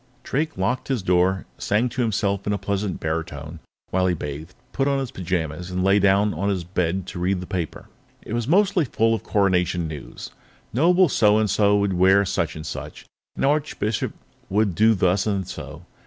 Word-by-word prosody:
Drake 155 0 -2
locked 100 +7 -1
his 130 -8 -1
door, 90 +1 +2
sang 105 +5 +1
to 125 +2 -3
himself 100 -3 0
in 105 - +1
a - - 0
pleasant 100 0 -2
baritone 80 -1 -4 0.3
while 95 0 +2
he 90 - +1
bathed, 75 +3 -7 0.2
put 135 0 0
on 140 -1 +2
his 135 -3 -3
pajamas, 85 -1 -3
and 90 0 -2
lay 100 +2 +4
down 100 +1 +3
on 95 +5 -1
his 95 -3 -1
bed 90 +1 -1
to 90 - -7
read 90 +1 0
the 90 - -6
paper. 90 -5 -4 0.4
It - - -7
was 120 -1 -1
mostly 195 +2 +3
full 115 -2 +1
of 110 - -1
Coronation 90 -4 +1
news. 75 -3 -8 0.4
Noble 175 - +4
So 105 -6 +4
and 110 -1 +2
So 105 0 +3
would 100 -1 +1
wear 95 +3 +4
such 85 -4 -1
and 75 0 -7
such, - - -7 0.3
the - - 0
Archbishop 140 -7 0 0.4
would 100 -1 +1
do 110 +5 +4
thus 95 +2 +1
and 100 -3 -1
so. 80 +1 -8
95 Hz, 190 wpm, -23 LUFS, 90-110 Hz, 0.4 s, lay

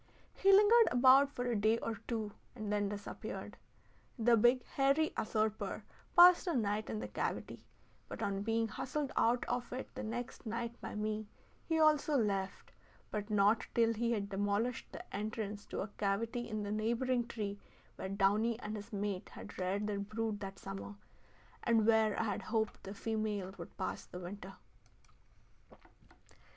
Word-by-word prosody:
He 390 - +4
lingered 425 +4 +7
about 260 +3 +6
for 245 -3 -4
a 240 -1 0
day 215 +2 +3
or 225 -1 -3
two 220 -3 -2 0.2
and 215 -3 -3
then 205 -1 +1
disappeared. 205 0 -6 0.6
The 235 0 +5
big 240 +3 +4
hairy 275 +3 +2
usurper 215 0 -1 0.3
passed 355 +1 +8
a 340 - +1
night 215 -2 0
in - - -2
the - - -4
cavity, - - -4 0.4
but - - -6
on 195 0 -1
being 225 +2 +1
hustled 265 +6 -3
out 240 +2 +2
of 245 0 -2
it 255 +1 -6
the - - -5
next 240 +2 -5
night 230 +1 -3
by - - -6
me, 215 0 -2 0.4
he 325 -1 +1
also 305 -1 +4
left, 195 -4 -1 0.4
but 210 0 -3
not 210 +1 +3
till 230 -1 +4
he 235 +1 0
had 205 -3 -1
demolished 205 +4 -1
the - - -9
entrance 210 0 -4
to - - -3
a - - -3
cavity 225 +4 -1
in 215 -1 -3
a 205 - -3
neighboring 235 +3 0
tree 205 -3 -4 0.4
where 190 - -5
downy 210 +4 +2
and 215 -2 -5
his 210 +3 -9
mate 200 -2 -3
had - - -10
reared 190 +3 0
their 205 -1 -2
brood 215 +1 -3
that 195 -1 -6
summer, 195 +1 -7 0.7
and 225 -2 +3
where 220 -2 +3
I - - +2
had 205 -3 -2
hoped 220 -1 -1
the 195 +2 -6
female 210 -4 -2
would 170 - -9
pass 185 - -4
the - - -8
winter. 190 +2 -8
220 Hz, 165 wpm, -34 LUFS, 205-240 Hz, 0.7 s, passed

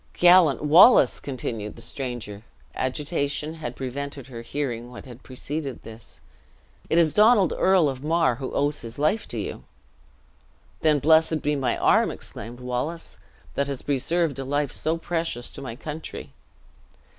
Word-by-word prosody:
"Gallant 175 -5 +5
Wallace!" 160 - +6
continued 115 -6 -5
the 115 - -12
stranger 120 -7 -6 0.3
agitation 145 +2 -2
had 135 -7 -6
prevented 140 +1 -6
her 120 -3 -9
hearing 120 -2 -4
what 125 +2 -11
had 125 -1 -12
preceded 140 +2 -6
this 110 -1 -12 0.7
"it 165 - +2
is 165 -3 +4
Donald 210 -4 +5
Earl 185 -4 +4
of 135 -1 -4
Mar, 160 -5 +2
who 130 -1 -5
owes 145 +1 0
his 115 0 -8
life 155 +10 0
to 120 - -7
you." 100 - -5 1.2
"Then 155 -2 +3
blessed 160 +1 +3
be 150 0 +1
my 135 -3 0
arm," - - +3
exclaimed 120 +2 -9
Wallace, 125 +7 -4 0.3
"that 140 - -1
has 140 -2 -5
preserved 145 +2 0
a - - -3
life 145 +1 -1
so 160 +2 -1
precious 165 -8 -3
to - - -9
my 125 -4 -6
country!" 155 +4 -8
140 Hz, 150 wpm, -24 LUFS, 125-160 Hz, 1.2 s, Wallace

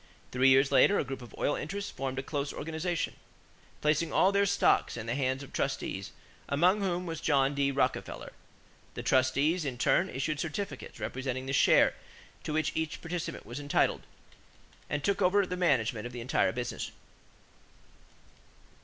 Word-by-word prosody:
Three 130 +1 +4
years 135 +1 +5
later 205 - +5
a - - +1
group 135 -1 -6
of 120 - -11
oil 145 - +1
interests 200 +6 -4
formed 135 -1 -4
a 135 - -2
close 140 0 -3
organization, 165 +3 -3 0.6
placing 155 +2 +1
all 190 - +4
their 200 0 +3
stocks 200 -9 +2
in 110 - -5
the 115 - -2
hands 130 0 -1
of 140 - -13
trustees, 100 -8 -2 0.4
among 180 +8 +3
whom 180 -2 -1
was 165 -2 -5
John 140 -2 +2
D. 140 -1 +1
Rockefeller. 130 - -2 0.6
The - - -5
trustees, 140 +6 +2
in 135 -4 -3
turn, 175 +9 +2
issued 145 +2 -2
certificates 160 -3 -5
representing 130 0 -3
the 135 - -3
share - - +5 0.5
to - - -3
which 155 0 +1
each 160 -1 -2
participant 170 0 -5
was 120 +4 -6
entitled; 145 0 +1 0.9
and 145 -1 -2
took 200 0 +1
over 195 +2 +4
the 180 - -4
management 120 -10 +1
of 120 - -11
the 120 - -6
entire 120 - +1
business. 120 0 -4
145 Hz, 160 wpm, -30 LUFS, 130-170 Hz, 0.9 s, years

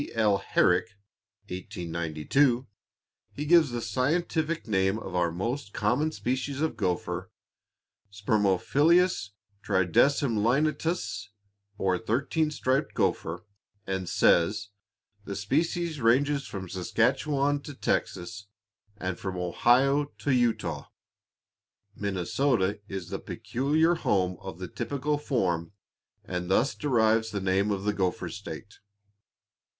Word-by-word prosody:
L. 105 -3 +3
Herrick, 100 +2 +2 0.5
1892, 90 - 0 0.7
he 150 - -4
gives 165 -2 +5
the 120 -1 -4
scientific 155 - 0
name 95 -1 +2
of 95 -4 -7
our 90 -2 +1
most 105 - -3
common 125 +10 +1
species 130 +1 -2
of 160 +1 0
gopher, 90 -1 -2 0.8
"Spermophilus 105 - +2 0.3
Tridecemlineatus," 120 - +1 0.5
or 95 -2 +1
thirteen 140 +8 0
striped 135 -1 -1
gopher, 85 +4 -1 0.4
and 95 -2 -3
says: 105 +5 +3 0.6
"The 100 - -5
species 155 - -1
ranges 135 +4 +2
from 95 -2 -6
the 95 - -10
Saskatchawan 140 +6 +1
to 145 - -8
Texas, 100 -3 -2 0.5
and 90 -3 -4
from 95 -2 -4
Ohio 125 +11 +3
to 145 - -1
Utah. 110 - 0 1.1
Minnesota 100 +2 0
is 95 -4 -6
the - - -3
peculiar 155 +7 +1
home 95 - 0
of 95 -3 -8
the 90 0 -6
typical 145 - -2
form, 90 - -1 0.5
and 90 0 -4
thus 115 +8 +3
deserves 115 -5 +2
the 105 -1 -3
name 95 +2 +1
of 100 -2 -1
the 105 0 +1
'Gopher 95 -3 -1
State.'" - - -9
110 Hz, 110 wpm, -28 LUFS, 95-140 Hz, 1.1 s, gives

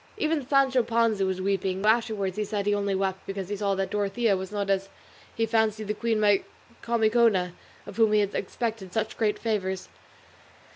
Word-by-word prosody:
Even 310 -5 0
Sancho 270 -2 +4
Panza 225 -4 +1
was 190 0 -2
weeping; 195 -1 -1
though 215 - +4
afterwards 220 -5 +1
he 215 - -1
said 205 -1 -3
he 205 - +2
only 200 -1 0
wept 190 0 -2
because 195 -1 -5
he 205 - -2
saw 200 -1 0
that 190 0 -2
Dorothea 205 +1 +1
was 190 0 -5
not 205 -1 -2
as 195 0 0 0.5
he 225 - +1
fancied 220 -1 0
the - - +1
queen 225 0 -1
Micomicona, 220 -1 +1 0.3
of - - -10
whom 220 -2 +4
he 210 - +5
expected 205 0 -3
such 220 -1 -1
great 215 -2 0
favours. 190 -4 -2
210 Hz, 180 wpm, -26 LUFS, 195-225 Hz, 0.5 s, he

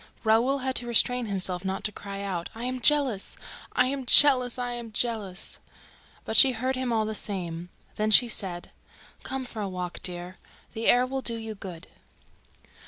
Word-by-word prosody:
Raoul 230 +5 +2
had 260 - -1
to 240 - -1
restrain 240 +1 +2
himself 185 -2 -1
not 190 0 -4
to 215 - +1
cry 200 -1 -8
out: 180 -4 -4
"I 230 - -8
am 255 0 -4
jealous! 270 -8 +2 0.4
I 250 - +3
am 265 -1 -4
jealous! 255 -3 +7
I 245 -1 -3
am 235 -2 -8
jealous!" 210 -4 -3 0.7
But 220 - -4
she 260 +3 +7
heard 255 +3 -2
him 255 -1 -3
all 220 -2 0
the 220 - -4
same. 175 -5 -5 0.3
Then 215 0 0
she 240 +3 +6
said: 185 -6 -4 0.5
"Come 265 -1 -5
for 225 -3 -8
a 200 - -3
walk, 180 -1 -6
dear. 180 0 -3 0.4
The 225 -1 -3
air 245 +1 +5
will 265 +1 -4
do 235 -2 0
you 225 -1 -6
good." 185 -4 -10
225 Hz, 180 wpm, -26 LUFS, 195-250 Hz, 0.7 s, jealous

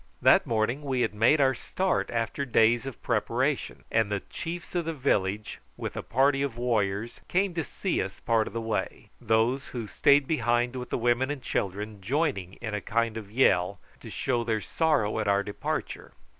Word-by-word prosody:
That - - +5
morning 115 +5 0
we 135 -3 -1
had 110 -3 +1
made 115 +8 +4
our 135 -1 +4
start 190 +8 -1
after 115 +3 -2
days 120 -1 +3
of 135 - -7
preparation, - - -1
and 110 -2 +2
the 100 -1 -1
chiefs 170 0 -6
of 175 -2 -1
the 165 0 -3
village 105 -7 0 0.2
with - - -5
a - - -3
party 135 +2 +2
of 135 -4 -2
warriors 115 -2 -1
came 190 0 +1
to 165 -1 -1
see 190 - -2
us 95 0 -5
part 115 -1 +1
of - - -8
the 115 - -2
way, 110 -1 -3
those 115 +4 +1
who 120 -3 -5
stayed 140 +6 +4
behind 120 -3 +1
with 125 -1 -5
the - - -1
women 120 +2 +1
and 145 -3 -4
children 100 +1 -3
joining 120 - -1
in 110 0 -6
a 105 - -2
kind 115 +1 0
of 110 -3 -7
yell 100 -6 +3 0.2
to - - -10
show 120 -3 -1
their 110 -2 0
sorrow 110 -6 +1
at 110 - -1
our 100 0 +3
departure. 100 0 -4
120 Hz, 190 wpm, -28 LUFS, 110-135 Hz, 0.2 s, That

